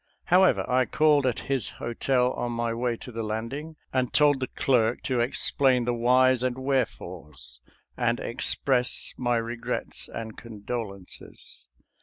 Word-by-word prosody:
However, 185 +1 +4
I 130 0 +3
called 150 -3 +3
at 125 - -1
his 135 -5 -1
hotel 125 +2 0
on 120 0 -3
my 115 0 -1
way 120 0 -1
to 125 - -10
the 115 -1 -4
landing, 115 +9 -4 0.2
and 130 -2 0
told 145 -2 +4
the 130 - -2
clerk 120 -3 +1
to 130 -2 0
explain 125 +1 +2
the 120 - +1
whys 125 +1 +4
and 130 0 -1
wherefores, 85 - -4 0.3
and 120 -1 0
express 125 0 -1
my 120 -1 0
regrets 115 +1 -4
and 110 -1 -6
condolences. 105 - -8
120 Hz, 140 wpm, -26 LUFS, 115-130 Hz, 0.3 s, However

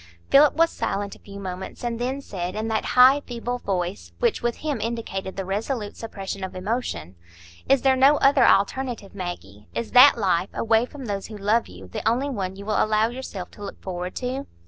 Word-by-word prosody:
Philip 290 +1 +6
was 330 +1 +3
silent 200 0 -3
a - - -18
few 200 -1 -11
moments, 190 +2 -7
and 235 -1 -2
then 260 +3 -2
said, 180 -7 -5
in 220 +1 -2
that 220 -1 -1
high, 260 +3 +8
feeble 245 0 -4
voice 175 - -3
which - - +1
with 240 -1 0
him 290 -7 -3
indicated 220 -5 -4
the 195 - -3
resolute 210 +3 -3
suppression 200 -3 -6
of 190 - -5
emotion,— 185 - -3 0.6
"Is 275 -1 +4
there 265 -1 +5
no 275 +3 +5
other 275 -1 +4
alternative, 230 -1 +1
Maggie? 140 - -7
Is 235 - -3
that 255 +1 +8
life, 190 -3 +1
away 225 +1 +2
from 275 -1 -9
those 200 -3 -3
who 215 - -8
love 210 +4 +1
you, 90 +1 -12
the 90 - -5
only 265 +5 0
one 190 -6 -3
you 200 +1 -9
will 215 0 +2
allow 215 +1 +2
yourself 235 -7 -7
to 205 - -12
look 200 - -7
forward 180 -1 -5
to?" 260 +2 -3
215 Hz, 200 wpm, -24 LUFS, 190-250 Hz, 0.6 s, high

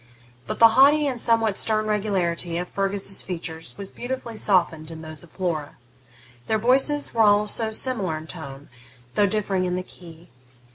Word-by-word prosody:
But - - -3
the 230 - +8
haughty 285 +5 +5
and 260 -4 -2
somewhat 225 -3 +2
stern 215 -1 +1
regularity 185 -5 0
of 180 +1 -3
Fergus's 195 0 0
features 165 -2 -6
was 200 -1 -7
beautifully 245 -2 -5
softened 170 -6 +1
in 160 -1 -8
those 155 -1 -8
of 170 - -5
Flora. 165 -6 -3 0.7
Their 220 - +2
voices 265 +6 +2
were 230 - +2
also 210 +1 +3
similar 215 -8 -1
in 155 - -9
tone, 145 -4 -9 0.4
though 205 +7 +3
differing 195 -2 -1
in 180 0 -1
the 180 - -3
key. 170 -2 -14
195 Hz, 160 wpm, -24 LUFS, 170-220 Hz, 0.7 s, the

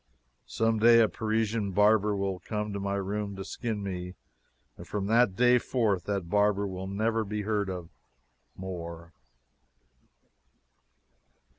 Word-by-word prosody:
Someday 115 +1 +4
a 115 - +5
Parisian 110 -2 -1
barber 105 +1 +4
will 95 -2 -2
come 105 0 -4
to 100 - -3
my 100 0 -2
room 100 +1 -3
to 95 0 -6
skin 110 -4 -4
me, 90 -1 -5 0.6
and - - -11
from 100 -2 -3
that 115 -2 +3
day 125 +2 +5
forth 110 -8 0
that 100 -4 -2
barber 105 +1 +2
will 95 -1 -5
never 110 +3 0
be 105 0 -4
heard 105 -2 -1
of 90 -3 -5 0.7
more. 85 -3 -7
100 Hz, 130 wpm, -28 LUFS, 95-110 Hz, 0.7 s, a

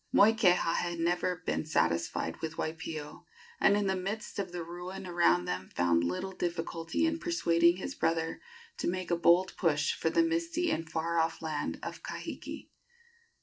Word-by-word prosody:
Moikeha 200 -6 +4
had 175 -1 -2
never 175 +1 0
been - - 0
satisfied 85 - 0
with 160 0 -4
Waipio, 160 -1 -5 0.3
and 200 - +5
in 205 - +1
the 190 0 +1
midst 200 +3 -4
of 190 -3 -3
the 175 -1 -4
ruin 180 +3 -7
around 170 - +3
them 90 +1 -4
found 85 -1 +3
little 90 - -2
difficulty 170 - -2
in 320 0 0
persuading 170 - +3
his 230 +9 -4
brother 165 - -1 0.4
to - - -1
make 185 0 -3
a - - +4
bold 175 +2 +4
push 150 -4 +2
for 160 - 0
the 335 - +3
misty 335 +1 0
and 165 - -2
far 165 +1 0
off 165 0 0
land 155 -2 -3
of - - -6
Kahiki. - - -7
170 Hz, 165 wpm, -31 LUFS, 160-190 Hz, 0.4 s, and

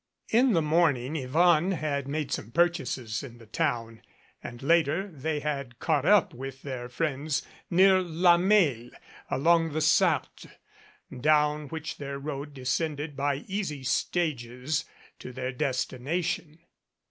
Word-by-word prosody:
In 245 +2 +4
the 165 -3 +2
morning 150 -4 +2
Yvonne 160 +6 +3
had 145 -4 -2
made 145 -1 -3
some 110 - -3
purchases 130 - 0
in 120 -4 -10
the 115 - -15
town 115 -3 -2 0.4
and 120 +1 -9
later 165 +4 +2
they 155 -3 -3
had 140 -5 -4
caught 150 -2 0
up 205 -4 +4
with 135 +1 -8
their 125 -3 -5
friends 150 +2 -2 0.2
near 190 +1 +5
La 175 0 +4
Mesle, 170 - +2 0.4
along 165 +2 +2
the 155 - 0
Sarthe, 155 - +2 0.7
down 150 +2 +2
which 160 +1 -6
their 140 -1 -5
road 145 0 -6
descended 145 +3 -2
by 140 +1 -1
easy 185 -9 -3
stages 135 -2 -1 0.3
to 125 - -8
their 130 +1 -4
destination. 150 +5 -2
150 Hz, 130 wpm, -28 LUFS, 130-165 Hz, 0.7 s, near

